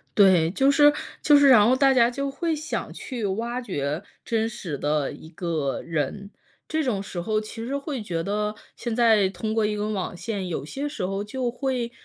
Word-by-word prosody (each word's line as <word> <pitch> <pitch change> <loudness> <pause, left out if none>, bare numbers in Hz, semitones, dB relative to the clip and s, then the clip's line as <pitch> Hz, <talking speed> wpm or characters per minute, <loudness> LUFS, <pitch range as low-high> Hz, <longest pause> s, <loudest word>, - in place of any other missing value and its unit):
对， 185 -5 +5
就 270 +7 +3
是 290 +1 +6 0.3
就 295 -1 +6
是 285 -1 +6
然 215 -5 +7
后 255 - +4
大 270 0 +4
家 240 -2 +5
就 275 +3 -3
会 325 +3 -1
想 310 +2 -4
去 245 -5 -6
挖 235 +6 -2
掘 150 - -3 0.2
真 225 -1 0
实 190 -10 -5
的 145 0 0
一 160 - -11
个 160 -6 -2
人， 165 +6 -3 0.4
这 315 0 0
种 220 -7 -1
时 175 -3 -5
候 215 +4 0
其 215 +1 -7
实 275 +3 -2
会 280 -3 -4
觉 170 -5 -3
得， 210 +2 -1 0.2
现 235 -2 -4
在 220 -5 +4
通 215 +3 -4
过 220 0 +2
一 210 0 -1
根 210 +1 -2
网 185 -2 -3
线， 200 -1 -4
有 150 -5 -3
些 275 - -4
时 235 -10 -3
候 195 +2 -2
就 245 +3 -3
会 250 -2 -2
215 Hz, 220 characters per minute, -25 LUFS, 185-255 Hz, 0.4 s, 然